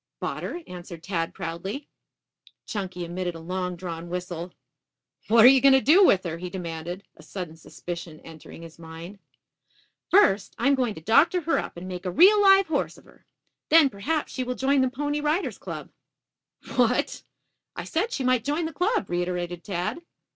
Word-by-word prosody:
"Bought - - -4
her," 350 - -5
answered 175 -2 -10
Tad 170 -3 -2
proudly. 195 - -6 0.8
Chunky 185 -4 -5
emitted 175 0 -4
a - - -8
long 180 +2 -3
drawn 170 -1 -7
whistle. 180 -1 -5 0.8
"What 225 +1 +6
are - - +12
you 265 0 +7
going 275 0 +6
to - - +5
do 320 +9 +5
with 190 - +4
her?" 165 -2 -5
he 180 +1 -5
demanded, 175 +1 -6
a - - -14
sudden 160 0 -7
suspicion 170 0 -8
entering 165 +1 -12
his 165 0 -13
mind. 165 +4 -10 0.9
"First, 210 - +3
I - - -2
am 280 - +5
going 250 -5 0
to 160 - -10
doctor 285 - +4
her 330 +1 +1
up - - -7
and 180 +2 -7
make 185 0 -6
a - - -1
real 390 - +6
live 390 -1 +6
horse 315 -4 -2
of - - -18
her. - - -22 0.4
Then, 310 -4 +6
perhaps, 295 +10 -2
she 255 - -2
will 250 0 -3
join 270 +1 +2
the 260 - +2
Pony 290 +3 -2
Riders' 305 +6 -1
Club." - - -7 0.9
"What?" - - +1 0.5
"I - - -5
said 390 +8 -1
she 270 - -2
might 255 -2 +2
join 295 +5 -1
the 320 - -5
club," 400 - 0
reiterated 175 0 -3
Tad. 180 - -3
195 Hz, 185 wpm, -25 LUFS, 175-285 Hz, 0.9 s, are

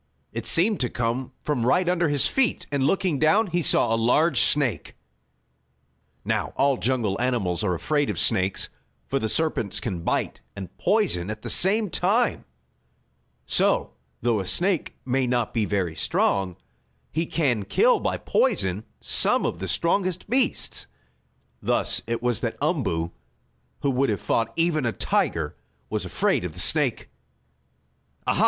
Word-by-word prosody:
It - - -4
seemed 200 +5 +4
to 125 - 0
come 120 +3 -2
from 145 -6 -1
right 175 +9 +2
under 175 -3 +1
his 145 -2 +2
feet, 265 -3 0
and, 140 -1 0
looking 180 -4 0
down, 160 +9 +4
he 175 -2 -1
saw 115 - +2
a - - +3
large 125 +9 +3
snake. 140 -6 +1 1.3
Now - - -1
all 140 -1 +3
jungle 115 -5 -1
animals 105 -9 0
are 90 -4 0
afraid 145 - 0
of - - -3
snakes 95 -4 +1 0.4
for 135 - -1
the 110 - -2
serpents 155 - 0
can 95 -7 -4
bite - - -2
and 95 -3 -8
poison 175 - +1
at 110 0 -6
the - - -1
same 205 +1 +3
time. 220 +7 +1 1.0
So - - +2 0.3
though 115 -3 +2
a 95 - -4
snake 180 - +1
may 130 0 0
not 120 -3 -1
be 110 -3 +1
very 95 -6 -1
strong, 95 0 0 0.6
he 165 +2 -1
can 130 -10 0
kill 475 - +3
by - - -1
poison 105 - 0 0.2
some - - +2
of - - -2
the 95 - -4
strongest 180 - 0
beasts. 250 +3 -1 0.7
Thus - - +2
it 115 0 -3
was 120 -3 0
that 115 - -3
Umboo, 125 - -1 0.7
who 140 - +1
would 135 +1 +1
have 105 - -1
fought 115 -1 0
even 165 -3 +1
a 115 -2 0
tiger, 75 -3 -1 0.4
was - - -2
afraid - - 0
of - - -5
the - - -9
snake. - - +1 1.2
"Ah, - - +2
ha! - - -2
130 Hz, 155 wpm, -24 LUFS, 110-170 Hz, 1.3 s, seemed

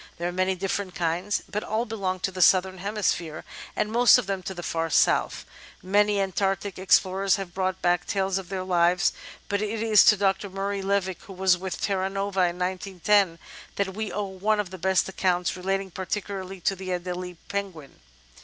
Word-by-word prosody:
There 170 - -2
are - - -2
many 185 +1 0
different 190 0 -3
kinds, 175 +4 -1
but 210 - -3
all 220 +3 -1
belong 195 -5 -3
to 190 - -1
the 185 0 -4
Southern 185 +1 +4
Hemisphere, 185 -5 -2 0.3
and 210 - -1
most 240 +1 +7
of - - -2
them 195 -1 -3
to 190 +1 -6
the 175 - -7
far 165 -1 -2
south. - - +2 0.4
Many 205 +2 +3
Antartic 195 0 -1
explorers 190 +1 +3
have 195 -4 -6
brought 185 0 -2
back 175 0 +2
tales 195 -1 0
of 185 - -10
their 190 -1 -3
life, 175 -1 +3 0.4
but 200 0 -1
it 215 +1 -2
is 220 -2 +6
to 210 - +6
Dr. 195 0 0
Murray 195 +1 -3
Levick, 195 -1 -1
who 195 - -10
was 185 0 +3
with 185 +1 -5
the - - -2
Terra 190 -2 0
Nova 195 -2 0
in 175 0 -4
1910, 185 0 +1 0.4
that 195 -1 -1
we 215 +1 -4
owe 205 0 -2
one 200 +3 0
of 195 -3 -2
the 185 - -8
best 190 +2 +2
accounts, 180 -2 0
relating 195 +1 -2
particu 195 +2 -4
larly 185 -1 -10
to 195 - +1
the 190 0 -7
Adelie 180 0 -4
Penguin. 190 -8 -5
190 Hz, 195 wpm, -26 LUFS, 180-200 Hz, 0.4 s, most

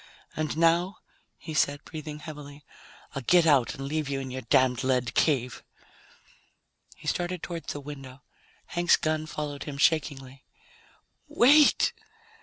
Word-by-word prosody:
"And 155 0 -2
now," 170 +4 +2 0.4
he 160 - -8
said, 145 -1 0
breathing 155 -1 -7
heavily, 150 -2 -10 0.5
"I'll 135 - -4
get 175 +7 +4
out 140 -6 +3
and 135 - -6
leave 150 0 -2
you 135 -1 -2
in 130 -1 -6
your 130 +1 -5
damned 125 0 +2
lead 125 -2 0
cave." 125 -5 +1 1.3
He - - -17
started 175 -1 -2
toward 170 -1 -6
the 145 - -4
window. 135 -2 -10 0.4
Hank's 175 0 +2
gun 155 0 -1
followed 150 -2 -5
him 145 -2 -6
shakingly. 140 -3 0 0.8
"Wait!" 295 - +5
145 Hz, 135 wpm, -27 LUFS, 135-160 Hz, 1.3 s, Wait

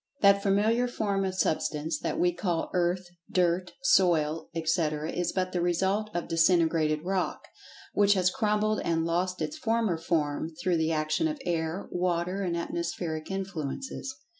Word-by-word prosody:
That 200 0 +6
familiar 215 +5 +2
form 200 -5 -1
of 190 -1 -2
Substance 155 -3 0
that - - -2
we 175 0 +3
call 175 -2 -2
"earth," 180 +1 +1 0.3
"dirt," 180 0 +1
"soil," 165 - +3
etc., 160 -1 0
is 175 -1 -1
but 185 -1 -1
the 175 - -1
result 190 +5 +1
of 175 - -2
disintegrated 160 -2 +2
rock, 185 0 -2 0.5
which 205 0 +4
has 185 -1 +3
crumbled 215 -3 +1
and 165 -1 0
lost 180 +2 -1
its 310 +2 -4
former 225 - +1
form 155 -2 -1
through 175 -1 +1
the 160 0 +1
action 155 - +1
of 305 -2 -4
air, 165 +2 -2
water 180 +1 -1
and 175 -3 -1
atmospheric 170 -2 -3
influences. 195 - -4
175 Hz, 150 wpm, -28 LUFS, 165-195 Hz, 0.5 s, That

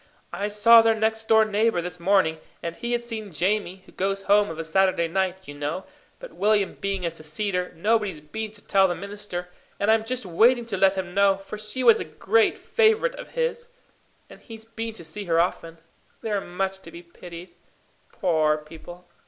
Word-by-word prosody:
"I 205 - -2
saw 220 +3 +7
their 225 0 +3
next 220 0 -1
door 220 -1 +5
neighbour 215 -1 +1
this 175 0 -5
morning, 170 -3 +2 0.2
and 170 0 -4
he 235 +3 -3
had 240 0 -1
seen 220 -4 -6
Jamie, 185 +2 -1
who - - -17
goes 195 +1 -2
home 205 +1 +3
of 160 - -7
a 165 - -3
Saturday 175 +1 +2
night, 190 +1 -2
you 145 - -7
know; 145 +6 -4 0.3
but - - -11
William 205 -1 +1
being 195 -2 -3
a 170 - -1
Seceder, 180 +4 -3
nobody's 205 -2 0
been 215 +9 -6
to 205 - -10
tell 195 -1 +4
the 175 - -2
minister, 200 -1 -6 0.3
and 205 +2 +3
I'm 220 0 +3
just 250 0 -2
waiting 235 +7 +3
to 225 -4 -4
let 195 +1 +4
him 185 -2 -4
know; 200 0 +4
for 195 +2 -9
she 215 +5 -4
was 230 -3 +6
a - - -2
great 215 +8 +1
favourite 460 +2 +2
of - - -10
his, 485 0 -1 0.6
and - - -14
he's 225 -2 -12
been 225 0 -6
to 170 - -10
see 165 +6 -7
her 165 -2 +2
often. 165 -1 -1 0.5
They're 210 -3 -1
much 190 +2 -3
to 170 - -13
be 170 +1 -11
pitied 170 +1 -11 0.6
poor 155 -6 +1
people! 165 +3 -12
195 Hz, 195 wpm, -24 LUFS, 175-220 Hz, 0.6 s, saw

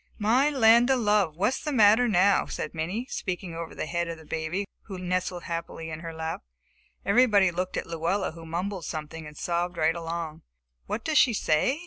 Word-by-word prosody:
"My 240 +7 +3
land 235 -3 +5
of 265 -1 +3
love, 205 -8 +2
what's 210 +8 0
the 300 - -2
matter 225 -1 +5
now?" 200 -1 +3
said - - -5
Minnie, 180 +9 -3
speaking 180 -7 -4
over 165 0 -6
the - - -3
head 170 +1 -2
of 165 -1 -5
the 160 - -14
baby, 160 +6 -2 0.2
who 195 -3 -7
nestled 180 0 -2
happily 165 -1 -5
in 155 - -5
her 165 0 -6
lap. 160 0 -4 0.6
Everybody 200 -4 +4
looked 180 +2 -3
at - - -2
Luella 170 +4 -1
who 165 +1 -11
mumbled 175 +2 -4
something 155 +1 -6
and 150 -1 -12
sobbed 175 0 -2
right 160 +1 +2
along. 165 -2 -5 0.5
"What 225 - -3
does 315 -2 +4
she 245 - +5
say?" 205 - +1
180 Hz, 190 wpm, -27 LUFS, 165-210 Hz, 0.6 s, land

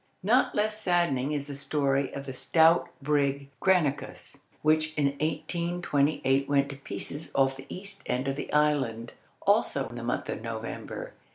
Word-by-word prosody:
Not 235 +7 +3
less 215 +1 0
saddening 170 -8 +1
is 145 -2 -2
the 145 - -7
story 140 -1 0
of 140 0 -6
the 135 - -5
stout 165 +5 +4
brig 140 -1 +1
Granicus, 150 -6 0 0.2
which 155 0 +2
in 145 -2 +3
1828 155 -4 0
went 140 -1 +3
to 140 - -8
pieces 145 +2 -5
off 135 -1 +3
the 135 0 -11
east 195 +2 -6
end 125 +2 -1
of 135 - 0
the - - -5
island, 135 -6 +1 0.3
also - - +2
in - - -9
the - - -6
month - - -2
of - - -4
November. - - -6
145 Hz, 160 wpm, -28 LUFS, 135-165 Hz, 0.3 s, stout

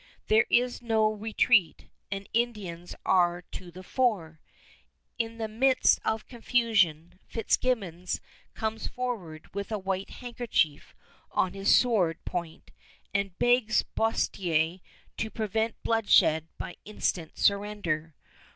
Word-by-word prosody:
There 220 +2 +5
is 245 +1 +2
no 220 -2 +2
retreat, 215 -4 +2 0.2
and 195 0 -5
Indians 205 -8 -2
are 175 -1 +3
to 180 0 -9
the 185 +2 -11
fore. 185 - 0 0.8
In 230 0 -2
the 225 -1 -2
midst 255 +4 +3
of 220 0 -1
confusion 205 -9 +1
Fitzgibbons 200 -7 -1 0.4
comes 220 0 -2
forward 200 -11 -5
with 200 +2 -4
a 215 - 0
white 190 0 -3
handkerchief 235 - -2 0.3
on 185 - 0
his 195 0 +4
sword 195 -10 +3
point 170 -3 -5 0.4
and 195 -2 -1
begs 245 -2 +3
Boerstler 175 -6 +1 0.4
to 220 - -2
prevent 220 +1 -1
bloodshed 160 -8 +4
by - - -7
instant 180 -6 -3
surrender. 200 -7 0
205 Hz, 115 wpm, -28 LUFS, 175-225 Hz, 0.8 s, There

